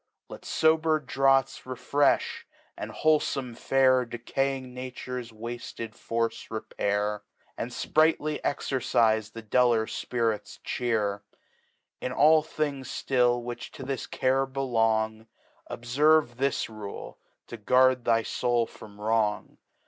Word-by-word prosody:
Let - - -10
fober 160 0 +3
Draughts 135 +1 +2
refrefli, 135 +3 +1 0.5
and - - -6
wlrolfom 135 -5 +1
Fare 130 0 +3
Decaying 130 +2 -3
Nature's 125 -1 -6
wafled 115 0 -7
Force 115 0 -3
repair; 105 -1 -2 0.3
And 120 - -4
fprightly 155 +3 +1
Exercife 110 -6 +1
the 115 0 -9
duller 115 0 +3
Spirits 115 -2 -2
chear. 105 -5 -1 0.8
1^ 125 - -3
all 155 +1 +6
Things 145 -4 -3
flill 120 -2 +2
which 120 0 -6
to - - -8
this 135 0 -4
Care 135 +1 +1
belong, 115 -4 0 0.4
Dbferve 135 +1 +2
this 135 +1 0
Rule, 110 -3 -8 0.3
to 120 - -8
guard 125 +3 +3
thy 115 -1 +2
Soul 120 -1 0
from 105 -2 -14
Wrong. 105 -1 0
125 Hz, 110 wpm, -27 LUFS, 115-135 Hz, 0.8 s, all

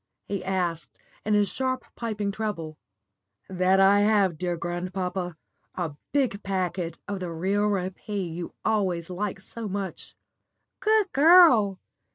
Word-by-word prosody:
he 200 -2 -3
asked, 180 -3 -2 0.2
in 215 0 +1
his 205 -1 +3
sharp, 260 -1 -2
piping 210 -3 -2
treble. 195 -7 -4 0.7
"That 185 +1 +2
I 195 +1 +6
have, 205 -4 +3
dear 175 +1 -2
grandpapa 180 0 -3 0.4
a 170 -4 -3 0.2
big 255 -8 +1
packet 180 -3 -2
of 200 -1 -3
the 180 -2 -4
real 195 +5 0
rappee 190 -1 -3
you 170 0 -6
always 185 -6 0
like 200 +1 -3
so 225 +3 -7
much." 195 -1 -5 0.6
"Good 430 -2 +2
girl. 275 - +6
195 Hz, 130 wpm, -26 LUFS, 180-210 Hz, 0.7 s, I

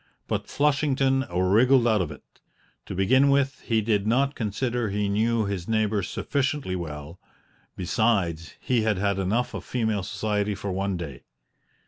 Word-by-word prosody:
But - - -2
Flushington 135 -2 +2
wriggled 115 +8 +4
out 110 -4 +3
of 85 - -2
it. 75 - -11 0.6
To - - -5
begin 130 +9 +4
with, 140 -1 +1
he 115 -2 +2
did 105 -1 0
not 135 +5 +2
consider 120 +1 -2
he 100 +1 -1
knew 110 +2 +1
his 100 -3 -4
neighbor 110 -2 +1
sufficiently 140 +1 -2
well; 75 -1 -7 0.6
besides, 90 -6 0
he 125 -3 +1
had 110 -2 +1
had 100 0 0
enough 105 +6 0
of - - -5
female 110 -5 -1
society 105 +1 -1
for 100 +1 -4
one 95 0 -1
day. 70 -8 -7
105 Hz, 150 wpm, -25 LUFS, 95-125 Hz, 0.6 s, wriggled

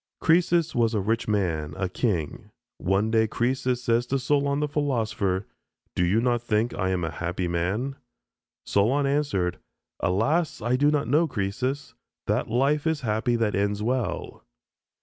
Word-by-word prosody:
Croesus 170 0 +3
was 115 -1 +2
a - - +2
rich 110 +4 -1
man, 80 -7 -1
a 95 -1 -1
king. 90 - -2 0.3
One 100 +4 +1
day 110 -1 +3
Croesus 125 +2 -1
said 115 0 +3
to 135 +2 0
Solon, 140 +1 +1
the 150 - 0
philosopher, 110 -10 -1 0.5
"Do 90 - +1
you 95 +6 +3
not 120 0 +1
think 115 0 0
I 95 -2 -1
am 90 -2 0
a 80 - -2
happy 90 +3 -3
man?" 100 +11 -1 0.7
Solon 125 +8 +2
answered, 135 -11 0 0.4
"Alas, 140 - +1
I 120 +3 +1
do 145 +3 +3
not 150 -4 +1
know, 155 +6 +3
Croesus; 130 +5 -3 0.3
that - - 0
life 140 +6 +2
is 160 -2 0
happy 115 +1 0
that 115 -3 +1
ends 100 +2 0
well." 125 +1 -2
115 Hz, 155 wpm, -26 LUFS, 100-140 Hz, 0.7 s, Croesus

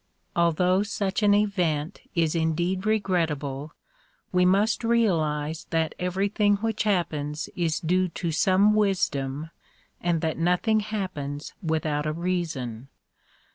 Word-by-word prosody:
Although 180 +3 +3
such 200 -1 -2
an 205 -1 +5
event 180 -5 0
is 165 -2 +2
indeed 175 +4 0
regrettable, 160 -9 -1 0.6
we 180 0 +3
must 205 +5 +2
realize 160 -10 +1
that 160 -1 0
everything 200 +3 +1
which 220 +1 -2
happens 155 -7 -1
is 165 -2 0
due 185 +2 +1
to 170 0 -3
some 190 +6 +4
wisdom 160 -8 0 0.5
and 170 -2 +1
that 160 0 -1
nothing 180 +6 +2
happens 185 -9 -4
without 155 -2 -1
a 155 - -1
reason. 160 -9 -3
175 Hz, 115 wpm, -26 LUFS, 155-200 Hz, 0.6 s, an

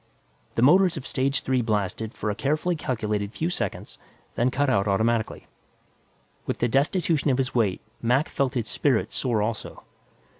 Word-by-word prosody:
The 115 - +2
motors 180 +4 +5
of 135 - -6
stage 135 +1 0
three 130 -1 +1
blasted 110 -1 -1
for 105 - -2
a - - -4
carefully 155 +8 0
calculated 105 -7 -2
few 165 +3 -2
seconds, - - -4 0.3
then 120 +2 +2
cut 145 +3 0
out 100 -5 +2
automatically. 110 +3 0 1.0
With - - -1
the 120 - +1
destitution 150 - +1
of 130 - +2
his 130 -1 -1
weight, 105 -6 +1 0.2
Mac 125 +6 +2
felt 135 0 -1
his 115 -3 -1
spirits 130 -3 0
soar 115 -5 +1
also. 110 0 -4
125 Hz, 160 wpm, -25 LUFS, 110-140 Hz, 1.0 s, motors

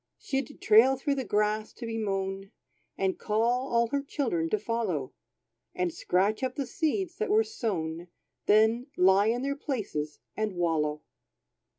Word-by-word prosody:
She'd 275 +1 -3
trail 230 +5 +6
through 285 +2 0
the 270 -1 -2
grass 210 0 0
to 240 - -8
be 225 0 -3
mown, 195 -1 -2 0.5
And 190 -1 0
call 235 +5 0
all 235 0 +4
her 280 +2 0
children 230 - -1
to 215 - +2
follow; 210 - -2 0.6
And 180 -2 -1
scratch 195 +4 +1
up 255 -1 -2
the 280 - -2
seeds 330 - -1
that 440 - -2
were 430 +2 +5
sown, 175 - -3 0.4
Then, 220 +4 +4
lie 190 +3 +5
in 240 +3 0
their 280 +1 -1
places 200 - -3 0.2
and 215 -3 -2
wallow. 155 -3 0
215 Hz, 155 wpm, -28 LUFS, 190-260 Hz, 0.6 s, trail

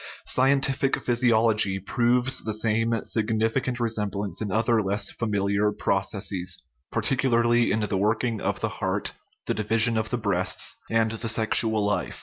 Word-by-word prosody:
Scientific 135 +1 +1
physiology 115 -5 +2
proves 125 +5 +1
the 110 -2 -4
same 115 +1 0
significant 115 +3 0
r6 120 -2 -1
semblance 105 -3 -2
in 105 -3 -3
other 115 +2 +2
less 100 0 -1
familiar 100 -1 0
processes, 95 -2 -2 0.3
particularly 120 0 +1
in 110 - 0
the 100 -2 -1
working 110 +2 0
of - - -2
the - - 0
heart, - - -2 0.3
the - - -1
division 110 +2 +2
of 110 0 -3
the 125 - -1
breasts, 100 -5 +2
and 115 -1 +1
the 115 +1 -3
sexual 110 -1 +2
life. 105 0 -2
110 Hz, 140 wpm, -25 LUFS, 105-120 Hz, 0.3 s, physiology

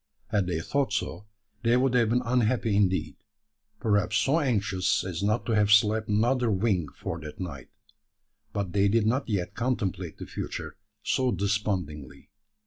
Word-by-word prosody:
Had 105 -5 +1
they 85 -3 -1
thought 135 +5 0
so, 105 +1 -3 0.3
they 120 +1 +3
would 130 0 +2
have 120 -3 +3
been 125 +2 +1
unhappy 115 -2 +1
indeed 95 -2 +1 0.6
perhaps 110 -1 +1
so 135 +8 +2
anxious 100 - +1
as 90 -3 -4
not 105 +3 0
to - - -2
have 105 -2 +3
slept 110 +1 +4
another 120 +3 +2
wink 95 -7 0
for 85 - -5
that 75 -1 -9
night. 75 -9 -6 0.8
But 100 -4 -3
they 100 0 +3
did 110 +1 +2
not 125 +4 0
yet 95 -5 -1
contemplate 95 -9 -2
the - - -7
future - - -6 0.3
so 130 -2 +1
despondingly. 95 - -3
105 Hz, 155 wpm, -27 LUFS, 95-115 Hz, 0.8 s, slept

